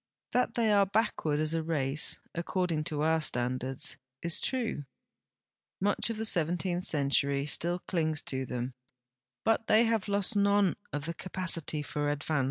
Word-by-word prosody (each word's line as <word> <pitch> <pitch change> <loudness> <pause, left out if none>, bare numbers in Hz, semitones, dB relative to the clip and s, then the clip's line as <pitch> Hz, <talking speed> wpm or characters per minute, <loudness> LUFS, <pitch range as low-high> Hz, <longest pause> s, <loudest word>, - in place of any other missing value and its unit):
That 245 -2 +1
the}" 225 -2 +2
are 200 -1 +4
l)ackward 195 -7 0
as 155 +1 0
a 165 - 0
race, 150 -2 0
according 170 -2 -1
to 150 -1 -1
our 160 0 +2
standards, 130 -1 -1 0.3
is 170 -1 +3
true. 235 - -1 0.9
Much 205 +3 +1
of 230 - -3
the 220 - -2
seventeenth 175 0 +1
century 140 -1 +1
still 170 +4 +1
clings 160 -4 0
to 130 -1 -3
them, 125 +1 -4 0.7
Imt 225 0 +2
they 220 +2 +5
have 225 -3 +1
lost 200 +2 +1
none 200 -2 +3 0.2
of 145 -1 -4
the 165 - -3
ca])acity 165 -5 0
for 145 -1 -1
advance. 145 +1 -1
165 Hz, 155 wpm, -30 LUFS, 145-200 Hz, 0.9 s, they